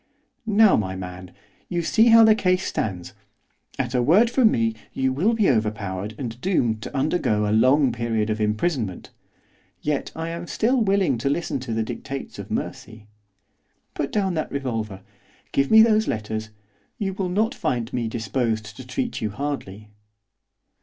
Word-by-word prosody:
'Now, 215 -1 +5
my 95 -3 -1
man, 90 0 -8 0.4
you 175 -1 -1
see 225 +7 +4
how 230 0 +8
the 220 -1 +7
case 185 -3 +1
stands, 90 -4 -3 0.6
at 125 -2 -2
a 125 - +2
word 195 - +4
from 245 -3 +5
me 115 - +1 0.2
you 130 0 0
will 185 - +2
be 215 -4 +2
overpowered 105 -3 -1
and 120 -2 -6
doomed 120 - +1
to 135 - -6
undergo 120 -8 +1
a - - 0
long 130 +4 +4
period 115 -2 -1
of 110 0 -2
imprisonment. 105 - -1 0.7
Yet 150 -1 -2
I 165 +1 -4
am 170 +1 -6
still 245 +7 +1
willing 195 - +2
to 140 - 0
listen 145 -1 -1
to 125 -3 -5
the 110 - 0
dictates 135 +4 -6
of - - -7
mercy. 110 -1 -5 0.8
Put 140 - -3
down 195 -3 0
that 155 -2 -3
revolver, 110 -8 -4 0.5
give 140 0 +1
me 220 0 +8
those 220 -1 +3
letters, 110 0 -3 0.5
you 195 -2 -2
will 190 -1 -2
not 215 +7 +1
find 125 - -2
me 120 -2 -1
disposed 110 -1 -2
to 130 - -10
treat 245 - -3
you 110 - -1
hardly. 105 -5 -5
130 Hz, 165 wpm, -23 LUFS, 110-180 Hz, 0.8 s, how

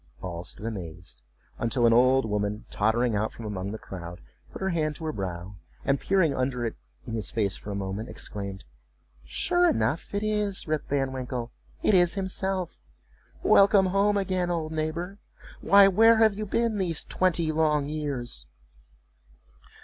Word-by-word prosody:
All 85 -2 -5
stood 100 - -7
amazed, 90 - -7 0.4
until 120 +1 +1
an 115 - +5
old 130 +1 +4
woman, 105 0 -2
tottering 110 +2 +1
out 105 +2 0
from 115 - -10
among 100 -2 -4
the 110 - -5
crowd, 85 -4 -8 0.3
put - - -8
her 190 - -1
hand 155 -3 0
to 160 - -7
her 155 - -1
brow, 95 - -5 0.3
and 140 0 +2
peering 185 -7 +2
under 130 -2 -1
it 115 - -2 0.3
in 115 - -6
his 110 -2 -2
face 100 -4 0
for - - -8
a 100 - -3
moment, 100 +4 -4
exclaimed, 100 -2 -6 0.6
"Sure 355 0 +2
enough! 175 - -1
it 205 - -1
is 210 -4 -1
Rip 155 -1 -1
Van 135 -2 0
Winkle—it 125 - -3
is 175 -1 +4
himself! 190 -1 -2 0.6
Welcome 200 -1 +6
home 200 +2 +2
again, 185 -2 0
old 165 -3 -2
neighbor—Why, 175 +5 +1
where 225 +4 +6
have 220 -2 +5
you 210 +1 -5
been 230 0 0
these 170 -5 -1
twenty 170 -3 +1
long 155 -2 +2
years?" 140 - -4
145 Hz, 155 wpm, -27 LUFS, -, 0.6 s, Welcome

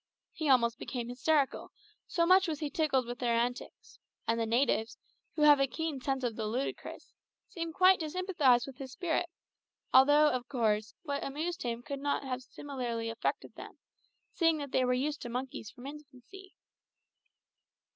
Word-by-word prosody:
He 315 -3 -3
almost 235 -3 +3
became 240 -2 -5
hysterical, 275 +3 0 0.4
so 335 -1 +1
much 370 +2 +5
was 310 -3 -3
he 300 -2 -3
tickled 280 -5 +1
with 240 +1 -6
their 235 -2 +1
antics; 245 +1 -3 0.3
and 230 +1 +1
the 225 - 0
natives, 230 -1 +1 0.4
who 305 - +1
have 295 -1 +7
a 275 - +3
keen 315 -1 -4
sense 270 0 -1
of 235 -3 -1
the 220 -2 -3
ludicrous, 250 +6 -5 0.3
seemed 335 -1 -5
quite 375 0 +6
to 315 -2 -3
sympathise 300 -9 +2
with 270 -2 -10
his 270 -2 -8
spirit, 350 0 -1 0.6
although, 290 +3 +7
of 250 -1 -3
course, 220 -4 0
what 285 -3 -3
amused 325 +6 -3
him 235 -1 -3
could 280 0 -5
not 285 0 -1
have 255 -1 -3
similarly 245 -4 -4
affected 225 - -3
them, - - -11 0.6
seeing 330 -2 +3
that 285 -3 -6
they 260 - +2
were 250 0 +2
used 290 +4 -1
to 240 - -6
monkeys 250 -3 -5
from 255 -1 -13
infancy. 295 +6 -12
270 Hz, 170 wpm, -31 LUFS, 245-305 Hz, 0.6 s, have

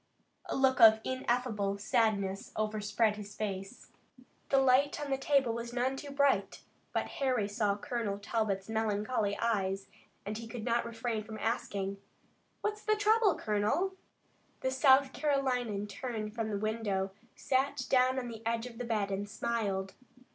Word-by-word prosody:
A - - -2
look 265 -1 +3
of 220 -1 +9
ineffable 240 -6 -1
sadness 200 -3 0
overspread 215 0 0
his 205 -1 -8
face. 195 +1 -5 0.6
The 275 - +4
light 270 +2 +4
on 290 -2 -4
the 270 - +2
table 270 -4 +2
was 235 +1 -5
none 255 +2 0
too 285 +2 -7
bright, 275 -9 +1 0.3
but - - 0
Harry 255 -7 +1
saw 205 -1 0
Colonel 230 -5 -2
Talbot's 200 -2 -1
melancholy 215 -1 0
eyes, 195 -4 0 0.4
and 215 +2 -4
he 230 - -7
could 225 -1 -6
not 235 -1 +1
refrain 230 -1 -3
from 220 +1 -8
asking: 200 -3 -2 0.6
"What's 420 0 -2
the 430 - +2
trouble, 425 -2 +4
colonel?" 215 - 0 0.7
The 260 - 0
South 265 0 +5
Carolinian 250 -8 0
turned 215 0 -5
from 225 -1 -2
the 205 - -1
window, 205 -3 -1 0.2
sat 260 -1 0
down 255 0 +3
on 250 -2 -2
the 225 -2 -7
edge 230 +1 -1
of 240 -2 -9
the 245 - -3
bed 210 -4 0
and 200 +1 -3
smiled. 205 -3 -2
225 Hz, 155 wpm, -32 LUFS, 205-260 Hz, 0.7 s, of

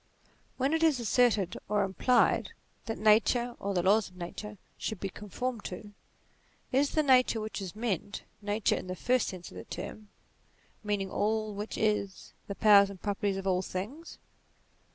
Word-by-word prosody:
When 270 +3 +1
it 320 - +1
is 315 -5 +4
asserted, 220 -5 +2
or 205 -1 +2
implied, 195 +6 +2 0.3
that 225 - -3
Nature, 235 +3 +3
or 200 0 -2
the 175 - +1
laws 205 +2 +3
of 180 - -21
Nature, 210 +4 -7 0.2
should 220 - -4
be 195 - -3
conformed 215 +4 -5
to, 205 +3 -7 0.8
is 275 +2 +3
the 310 - +4
Nature 255 -4 +4
which 215 -1 -5
is 190 -1 -6
meant, 205 -3 -3 0.2
Nature 205 +1 +1
in - - -7
the 185 - -4
first 250 +6 +1
sense 180 -2 -7
of - - -11
the - - -7
term, 215 -1 -8 0.7
meaning 205 -2 -1
all 215 0 0
which 205 +2 -5
is 210 -3 -1
the 200 - -4
powers 200 -2 +6
and 195 -2 -9
properties 200 -1 -1
of 195 - -5
all 185 -1 +2
things 215 - -6
210 Hz, 170 wpm, -30 LUFS, 195-235 Hz, 0.8 s, powers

